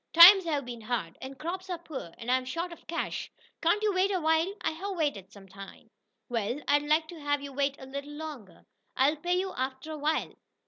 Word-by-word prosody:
Times 360 Hz, +3 st, +10 dB
have 295 Hz, -5 st, -1 dB
been 240 Hz, -2 st, -7 dB
hard, 215 Hz, -7 st, -3 dB
and 265 Hz, +1 st, -7 dB
crops 370 Hz, +5 st, -5 dB
are 355 Hz, -, -2 dB
poor, 305 Hz, -, -7 dB
and 240 Hz, +1 st, -3 dB
I'm 255 Hz, 0 st, +3 dB
short 335 Hz, +7 st, -4 dB
of -, -, -16 dB
cash. 335 Hz, +2 st, -3 dB, 0.3 s
Can't 345 Hz, +6 st, +2 dB
you 420 Hz, -2 st, +2 dB
wait 370 Hz, +2 st, +3 dB
a 380 Hz, -2 st, +1 dB
while?" 320 Hz, +3 st, +2 dB
"I 320 Hz, -, 0 dB
have 380 Hz, +4 st, -5 dB
waited 215 Hz, -, -1 dB
some 195 Hz, -1 st, -14 dB
time." 195 Hz, +1 st, -12 dB, 0.4 s
"Well, 240 Hz, +2 st, -1 dB
I'd 290 Hz, 0 st, +4 dB
like 305 Hz, +2 st, +2 dB
to 340 Hz, -, -9 dB
have 290 Hz, -1 st, 0 dB
you 280 Hz, -1 st, -7 dB
wait 280 Hz, 0 st, 0 dB
a 265 Hz, -, -9 dB
little 280 Hz, +2 st, -6 dB
longer. 295 Hz, -, -8 dB, 0.3 s
I'll 285 Hz, +4 st, +4 dB
pay 355 Hz, +4 st, 0 dB
you 380 Hz, 0 st, -2 dB
after 260 Hz, +4 st, -3 dB
a 310 Hz, -, -5 dB
while." 310 Hz, +2 st, 0 dB
295 Hz, 220 wpm, -29 LUFS, 260-335 Hz, 0.4 s, Times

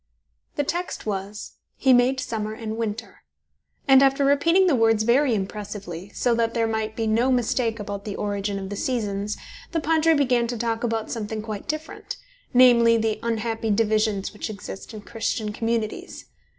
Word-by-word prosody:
The 290 Hz, -, +1 dB
text 350 Hz, +5 st, -3 dB
was: 200 Hz, 0 st, -5 dB, 0.2 s
"He 265 Hz, -2 st, +4 dB
made 250 Hz, +2 st, +4 dB
summer 215 Hz, -3 st, -3 dB
and 220 Hz, -1 st, -5 dB
winter", 225 Hz, -2 st, -5 dB, 0.7 s
and 270 Hz, -1 st, +7 dB
after 275 Hz, +1 st, +3 dB
repeating 335 Hz, +7 st, +4 dB
the 350 Hz, -, +3 dB
words 225 Hz, -2 st, +3 dB
very 245 Hz, +2 st, +3 dB
impressively, 200 Hz, -2 st, -5 dB
so 245 Hz, -, +2 dB
that 230 Hz, 0 st, 0 dB
there 230 Hz, -1 st, +2 dB
might 220 Hz, -1 st, -2 dB
be 225 Hz, -, -1 dB
no 230 Hz, +4 st, +2 dB
mistake 235 Hz, -2 st, 0 dB
about 200 Hz, -1 st, -5 dB
the 205 Hz, -, -5 dB
origin 205 Hz, -1 st, -2 dB
of 195 Hz, 0 st, -6 dB
the -, -, -3 dB
seasons, 210 Hz, -3 st, -2 dB, 0.4 s
the 330 Hz, -, +1 dB
Padre 320 Hz, +1 st, +3 dB
began 250 Hz, -4 st, +2 dB
to 240 Hz, 0 st, -3 dB
talk 230 Hz, 0 st, -2 dB
about 225 Hz, -2 st, -1 dB
something 220 Hz, -1 st, -4 dB
quite 215 Hz, -2 st, -6 dB
different 310 Hz, +1 st, -5 dB, 0.3 s
namely, 235 Hz, -2 st, +6 dB
the 220 Hz, -1 st, 0 dB
unhappy 225 Hz, -1 st, -2 dB
divisions 215 Hz, -1 st, +1 dB
which 210 Hz, -, -5 dB
exist 200 Hz, 0 st, -8 dB
in 215 Hz, -2 st, -8 dB
Christian 220 Hz, -1 st, -3 dB
communities. 225 Hz, -1 st, -3 dB
225 Hz, 165 wpm, -24 LUFS, 210-245 Hz, 0.7 s, and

